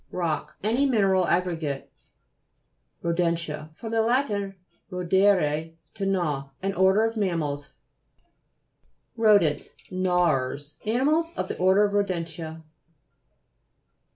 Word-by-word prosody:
ROCK 155 -3 -2
Any 240 +7 +2
mineral 195 -7 +3
aggregate 165 -6 -1 1.1
(p.13). - - -3
RODENTIA 165 -3 -1
fr. 225 - -8
lat. 235 +5 +2 0.6
rodere, 180 -4 +2 0.2
to 195 - -4
gnaw. 155 -8 -1
An 195 0 0
order 190 +4 +4
of 225 0 -2
mammals. 160 -8 -2 1.4
RODENTS 205 -9 +3 0.2
Gnawers; 155 -6 0
animals 300 +9 +2
of 185 - -2
the - - -4
order 190 +3 +5
of 205 -1 +1
rodentia. 165 -5 -2
180 Hz, 100 wpm, -26 LUFS, 160-205 Hz, 1.4 s, order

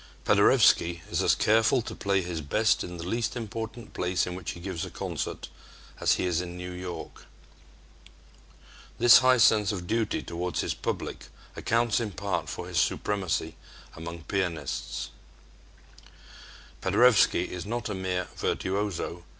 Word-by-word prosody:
Paderewski 85 -1 +4
is - - +1
as - - +4
careful 115 +3 +3
to 115 - -6
play 100 -2 0
his 85 -2 -4
best 105 +10 +2
in 90 0 -7
the 85 - -6
least 115 +4 -1
important 115 0 -6
place 90 0 0
in 90 - -5
which 90 -2 -5
he - - -10
gives 90 -2 -4
a - - -5
concert - - -4 0.5
as - - +3
he - - -1
is 90 -1 +1
in 90 -1 -7
New 90 0 -6
York. 90 -2 -8 1.7
This 120 0 +8
high 130 0 +5
sense 110 -3 +4
of 90 -4 -5
duty 110 +2 -1
toward 90 +1 -4
his - - 0
public - - -4 0.3
accounts 115 -1 +1
in 115 -3 -2
part 100 - -3
for - - -6
his - - 0
supremacy 90 -5 -1 0.4
among 85 0 -7
pianists 90 -4 -3 1.7
Paderewski 125 -5 +4
is 90 +2 -6
not 120 +2 -3
a 105 - -3
mere 95 -2 -2
virtuoso. 95 -3 -2
95 Hz, 145 wpm, -27 LUFS, 90-110 Hz, 1.7 s, This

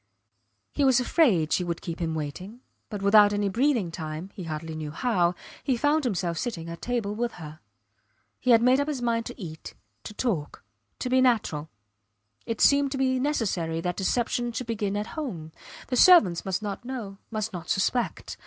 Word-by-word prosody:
He 290 - 0
was 265 -2 +5
afraid 235 - +3
she 180 - +2
would 170 -1 -3
keep 170 0 -5
him 165 -2 -2
waiting, 180 - -6 0.3
but 205 -3 -5
without 205 0 +6
any 205 -1 0
breathing 235 - +1
time, 160 +3 -6
he 185 - -7
hardly 160 0 -5
knew 155 -1 -5
how, 180 -1 +1 0.3
he 260 -3 +1
found 295 +3 +2
himself 180 -7 -1
sitting 190 -10 -4
at 170 - -8
table 235 -4 -2
with 235 +2 -2
her. 155 -2 -10 0.8
He 255 - -2
had 230 -1 +6
made 255 +2 +5
up 285 - 0
his 295 -4 -2
mind 230 -1 0
to 245 - -9
eat, 160 -5 -8 0.3
to 210 - -8
talk, 180 - -2 0.3
to - - -3
be 255 +1 +3
natural. 205 - +1 0.8
It 225 -2 -3
seemed 280 -1 +4
to - - -3
him 260 -1 +1
necessary 190 - -1
that 180 +1 -2
deception 240 +4 0
should 245 +2 -4
begin 205 -3 -2
at 210 - -2
home. 180 - -5 0.4
The 255 - 0
servants 220 - +6
must 190 +2 -2
not 205 +2 -4
know 230 -6 -6
must 215 -1 -3
not 175 -1 -7
suspect. 235 +5 -1
210 Hz, 185 wpm, -26 LUFS, 170-250 Hz, 0.8 s, without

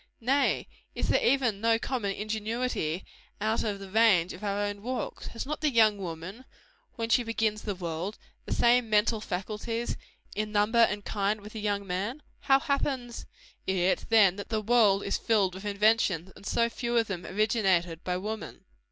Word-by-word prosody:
Nay, 270 +4 +1 0.3
is - - -2
there - - +3
even 240 -6 +2
no 225 0 +3
common 225 -5 -2
ingenuity 215 -5 -2 0.3
out 220 +2 0
of 210 -2 -2
the 195 -1 -10
range 205 -6 +4
of - - -11
our 200 0 -1
own 205 0 -3
walks? 250 +3 -4
Has 230 - -5
not 300 +2 -4
the 305 - +3
young 220 -5 +4
woman, 185 +7 -7 0.5
when 230 -1 -2
she 235 - +4
begins 225 -2 -1
the 205 -3 -3
world, 175 +3 -4 0.3
the - - -7
same 240 -1 +3
mental 215 +1 +2
faculties, 215 +4 -3 0.4
in 215 0 -2
number 210 +3 +2
and 205 -3 +3
kind, 205 +1 0
with 210 +1 -11
the 220 - -5
young 205 -1 -1
man? 200 +10 -3 0.2
How 270 -1 +4
happens 265 -4 -2 0.4
it, 190 -1 +1
then, 205 -5 +5
that 205 - -7
the 220 -2 0
world 215 -3 +4
is 200 - -1
filled 205 -5 +2
with 190 +2 -9
inventions, 200 -4 +2
and 200 - -11
so 235 - +2
few 235 0 -2
of 230 - +3
them 185 -4 -5
originated 185 -5 +1
by 180 0 -1
woman? 215 +3 -6
215 Hz, 180 wpm, -28 LUFS, 195-230 Hz, 0.5 s, then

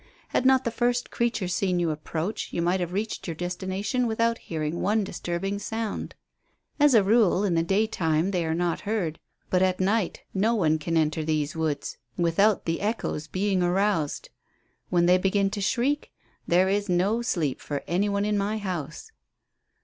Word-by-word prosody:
Had 260 - +2
not 265 0 +5
the 235 - -1
first 245 +1 0
creature 235 -5 0
seen 180 0 0
you 170 -2 +1
approach 160 +6 -4
you - - -3
might 175 +2 +1
have 175 -1 -2
reached 210 +3 -3
your 165 - -3
destination 190 - -2
without 230 +1 +1
hearing 155 0 -3
one 215 +1 +2
disturbing 190 +2 -3
sound. 220 +1 -4 0.6
As 290 -3 +6
a 215 - +6
rule, 205 -2 +3
in 195 -4 +1
the 165 - +3
daytime, 180 -3 +1
they 180 -3 0
are 160 0 -1
not 175 0 0
heard, 200 -7 -2 0.3
but 185 - +3
at 185 -1 +2
night 195 0 0
no 215 +5 +2
one 160 -6 +2
can 165 +2 -1
enter 155 0 +1
these 155 -1 -1
woods 155 -3 -2 0.2
without 180 +5 +2
the 165 0 -1
echoes 205 -7 -2
being 190 -1 0
aroused. 180 -3 0 0.6
When 175 -1 +3
they 180 +1 +5
begin 195 +1 +1
to 205 -1 -3
shriek 260 +8 0 0.4
there 180 +2 +4
is 200 +1 0
no 195 +6 +2
sleep 160 - -1
for 145 -1 -4
any 195 +4 +1
one 200 0 0
in 210 -1 +1
my 205 +2 -1
house." 185 - -5
190 Hz, 175 wpm, -26 LUFS, 170-210 Hz, 0.6 s, As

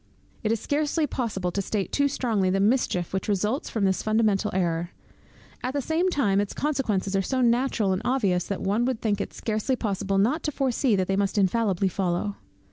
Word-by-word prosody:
It 220 - 0
is 225 - +1
scarcely 300 +4 0
possible 205 -10 -2
to 200 - -1
state 195 0 -2
too 285 0 +2
strongly 225 -8 0
the 195 +1 +1
mischief 200 -5 +1
which 190 - -2
results 210 +6 0
from 215 -3 0
this 190 -1 +1
fundamental 215 -1 +2
error. 175 -2 0 0.7
At 255 - -3
the - - +1
same 330 +7 +1
time 205 - +2
its 205 - -4
consequences 220 -10 -1
are 195 - +3
so 255 +6 -1
natural 235 -4 +2
and 185 - -2
obvious, 200 -9 +1
that 200 - -4
one 205 +5 +1
would 255 -3 -1
think 205 -2 0
it - - -4
scarcely 220 +4 -1
possible 200 -4 -1
not 250 +12 +2
to 300 - -2
foresee 260 -3 +1
that 185 -1 0
they 195 - +1
must 200 +1 0
infallibly 195 -1 +2
follow. 190 +2 -1
210 Hz, 200 wpm, -26 LUFS, 195-255 Hz, 0.7 s, are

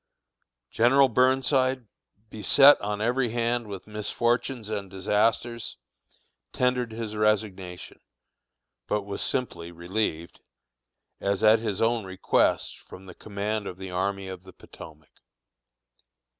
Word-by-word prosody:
General 135 +4 +4
Burnside, 130 +1 +2 0.5
beset 135 +6 +6
on 105 0 -3
every 120 +2 +1
hand 120 0 -1
with 100 -3 -8
misfortunes 115 +3 -1
and 100 -3 -4
disasters, 110 +4 -1 0.7
tendered 125 -2 0
his 110 -1 -5
resignation, 100 -4 -2 0.9
but 105 -1 -1
was 100 0 -5
simply 85 -10 -3
relieved, 85 -1 -3 0.8
as 100 +2 -1
at 110 +1 +6
his 110 -2 -2
own 115 0 +1
request, 95 -1 0
from 95 - -13
the 90 - -11
command 105 +1 -4
of 90 - -7
the 95 -1 -8
Army 95 +1 -2
of 95 -1 -7
the 95 0 -15
Potomac. 80 -3 -14
105 Hz, 115 wpm, -26 LUFS, 95-120 Hz, 0.9 s, beset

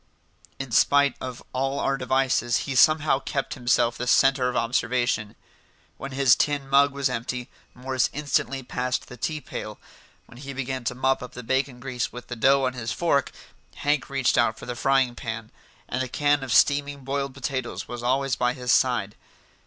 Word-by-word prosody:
In 135 -2 -6
spite 140 +3 +4
of 125 -1 -6
all 135 +2 -1
our 135 - +1
devices 130 -2 +1
he 135 - -3
somehow 150 +1 +4
kept 135 0 -3
himself 120 -2 +1
the 125 - -3
centre 135 0 +4
of 125 - -5
observation. 120 -2 0 0.6
When 135 - -7
his 135 -2 +4
tin 145 -2 0
mug 140 +1 +4
was 140 0 0
empty, 125 0 -4 0.2
Morris 130 0 0
instantly 140 -2 -1
passed 125 0 -2
the 125 - -9
tea 155 +6 -3
pail; - - -7 0.5
when 120 - -15
he 140 0 -7
began 130 -1 -4
to 125 - -1
mop 130 +1 +1
up 125 - -8
the 125 - -8
bacon 130 +1 -1
grease 125 -1 -3
with 125 0 -10
the 120 - -4
dough 135 +4 +4
on 130 -1 0
his 115 -3 -4
fork, 160 -5 +1 0.4
Hank 145 -2 0
reached 135 -3 +1
out 115 -2 +2
for - - -10
the 125 - -5
frying 135 -1 +2
pan; 115 -1 -6 0.4
and 125 - -2
the 130 - -2
can 145 +2 +2
of 130 - -5
steaming 145 +1 +3
boiled 135 0 -3
potatoes 130 -2 -4
was 120 -1 -6
always 135 +2 +1
by 125 0 +1
his 125 -2 -2
side. 120 -6 +2
130 Hz, 185 wpm, -25 LUFS, 125-135 Hz, 0.6 s, spite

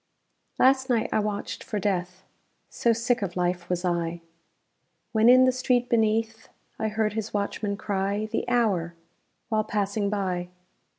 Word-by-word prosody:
Last 265 0 +4
night 235 -3 +1
I - - +3
watched 210 -1 -3
for 210 - -4
Death 185 -2 -2 0.5
So 235 - +1
sick 235 +1 +1
of 195 -3 -3
life 175 -1 -1
was 180 0 -1
I! 170 -1 -1 0.9
When 220 +1 +4
in 255 +1 +8
the 255 - +4
street 250 -1 0
beneath 225 0 0 0.3
I 220 - 0
heard 215 -1 0
his 220 -1 -4
watchman 200 0 -2
cry 200 +1 -1
The 220 +2 -3
hour, 195 -9 +1 0.5
while 215 -1 +1
passing 205 -1 -1
by. 185 -3 -2
210 Hz, 150 wpm, -26 LUFS, 190-225 Hz, 0.9 s, in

